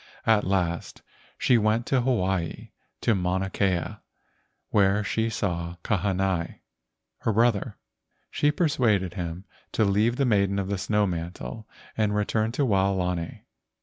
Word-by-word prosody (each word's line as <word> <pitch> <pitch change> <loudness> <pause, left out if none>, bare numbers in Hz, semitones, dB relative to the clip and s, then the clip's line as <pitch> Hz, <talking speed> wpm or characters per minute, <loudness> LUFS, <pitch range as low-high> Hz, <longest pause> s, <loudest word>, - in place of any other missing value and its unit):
At 110 -3 +3
last 90 -3 -1 0.3
she 125 -2 +4
went 110 +2 +1
to 130 -1 +2
Hawaii 95 -9 -1 0.3
to 120 - +3
Mauna 95 0 -1
Kea, 90 -4 0 0.7
where 100 0 +3
she 110 +2 0
saw 85 -6 -2
Kahanai, 95 -3 -1 0.6
her 115 - 0
brother. 115 -1 +1 0.5
She 145 - +2
persuaded 120 - +1
him 85 0 -5 0.3
to 110 - +3
leave 105 +4 +2
the 140 - +1
maiden 100 -4 +2
of 95 -1 -2
the 100 -2 -1
snow 105 +1 +1
mantle 85 - -5 0.3
and 105 -2 +1
return 110 +2 0
to 140 +2 +1
Waolani. 95 -5 0
100 Hz, 130 wpm, -26 LUFS, 90-110 Hz, 0.7 s, she